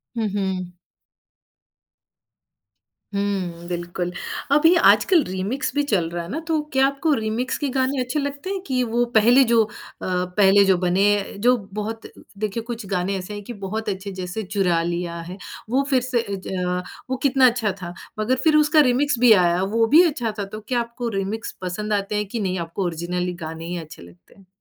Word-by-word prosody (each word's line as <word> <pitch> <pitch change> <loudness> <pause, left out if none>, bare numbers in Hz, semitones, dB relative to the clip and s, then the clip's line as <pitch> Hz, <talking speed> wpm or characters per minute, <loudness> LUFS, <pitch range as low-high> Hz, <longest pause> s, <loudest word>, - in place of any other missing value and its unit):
हुँ, 225 -2 0
हुँ। 185 -2 -3 2.4
हुँ, 185 -4 -2
बिल्कुल। 175 0 -3 0.4
अभी 310 +4 +6
आजकल 340 -1 +5
रीमिक्स 190 +11 -3
भी 290 - +2
चल 170 -5 +2
रहा 170 0 -4
है 170 - -9
ना, 290 - -3
तो 320 -2 +1
क्या 265 0 +4
आपको 280 +3 0
रीमिक्स 225 +2 -1
के 290 - -2
गानें 260 +1 +1
अच्छे 250 +4 -1
लगते 285 +5 -4
हैं 390 -1 -2
कि 255 -1 +1
वो 240 +1 +1
पहले 240 +5 +6
जो 230 -1 +6
अ, 215 - -8 0.3
पहले 190 +2 +3
जो 190 -2 +4
बने, 195 +3 +1
जो 245 +5 +4 0.2
बहुत 220 +2 -4 0.3
देखिए 215 +2 -3
कुछ 235 -2 -6
गानें 190 0 -1
ऐसे 185 +3 -6
हैं 205 0 -7
कि 240 - -7
बहुत 215 +3 -3
अच्छे, 195 0 -4
जैसे 185 +3 -5
चुरा 185 -4 +1
लिया 170 0 -3
है। 185 - -7 0.3
वो 265 +4 +2
फिर 260 -3 +3
से 250 -1 0
अ, 185 -3 -3 0.3
वो 260 - -1
कितना 270 -1 +4
अच्छा 235 -4 +1
था। 175 -1 -6 0.3
मगर 225 +4 +2
फिर 310 -1 +4
उसका 305 +1 +4
रिमिक्स 275 +2 +1
भी 245 -2 +6
आया, 175 -2 +3
वो 225 +4 +2
भी 310 +8 +7
अच्छा 240 -8 -2
था। 200 - -1
तो 215 +2 -8
क्या 245 -1 +1
आपको 235 0 -4
रिमिक्स 205 +4 -3
पसंद 210 +4 -3
आते 200 +1 -1
हैं, 210 0 0
कि 230 +3 -4
नहीं, 185 -3 -1
आपको 170 +4 -3
ओरिजिनल 175 +1 -2
गानें 160 0 -6
ही 175 +1 -4
अच्छे 160 -2 -9
लगते 85 +1 -17
हैं? 195 - -20
205 Hz, 190 wpm, -22 LUFS, 180-245 Hz, 2.4 s, भी